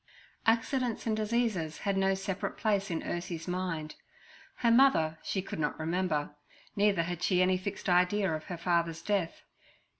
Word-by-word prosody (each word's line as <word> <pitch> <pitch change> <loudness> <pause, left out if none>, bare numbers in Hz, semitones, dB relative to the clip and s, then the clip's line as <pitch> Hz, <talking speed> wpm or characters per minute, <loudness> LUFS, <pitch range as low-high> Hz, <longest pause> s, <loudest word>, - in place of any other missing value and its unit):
Accidents 235 +1 +1
and 220 -2 +1
diseases 215 -7 0
had 200 -1 +1
no 195 0 +2
separate 195 0 -4
place 200 -2 +1
in 165 -2 -2
Ursie's 170 -1 -4
mind. 180 -4 -3 0.6
Her 235 -2 +2
mother 195 -12 +4
she 190 - -2
could 190 - -6
not 150 0 -1
remember; 160 -3 -1 0.4
neither 200 -4 +3
had 175 0 -4
she 180 -1 +2
any 185 0 +3
fixed 200 +1 -5
idea 180 +1 +3
of 155 0 -4
her 175 - -5
father's 170 -1 0
death. 195 -5 -1
185 Hz, 155 wpm, -30 LUFS, 165-205 Hz, 0.6 s, mother